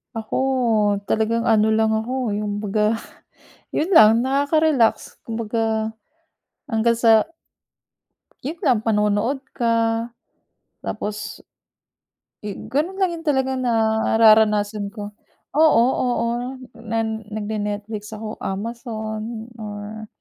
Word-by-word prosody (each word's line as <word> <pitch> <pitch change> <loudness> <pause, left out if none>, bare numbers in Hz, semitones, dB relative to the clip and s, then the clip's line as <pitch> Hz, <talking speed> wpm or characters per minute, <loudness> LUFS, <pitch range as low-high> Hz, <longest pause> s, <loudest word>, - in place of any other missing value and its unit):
Ako 220 -1 -4 0.7
talagang 230 +1 +1
ano 220 -1 +4
lang 220 0 +2
ako, 240 -1 -2
yung 205 0 -2
kumbaga 215 +2 0 0.7
yun 345 +6 -1
lang, 225 -4 +7
nakaka-relax 280 -2 +1
kumbaga, 225 -1 -2 0.7
hanggang 230 -3 +1
sa 225 +4 +4 1.1
yun 310 +6 -4
lang 240 -5 +3
panonood 210 +3 +1 0.2
ka 230 0 +1 0.8
tapos, 210 +1 -5 1.1
eh, 205 - -4 0.2
ganun 305 +9 0
lang 345 -4 -1
talaga 265 -2 +1
nararanasan 220 -3 +3
ko, 205 -2 -6 0.4
oo, 300 -6 +5 0.2
oo 240 -1 0 0.5
na 230 0 -3
nagne-netflix 210 -1 -4
ako, 215 0 -7
amazon, 220 +1 -5
or 215 0 -7
220 Hz, 90 wpm, -22 LUFS, 215-240 Hz, 1.1 s, lang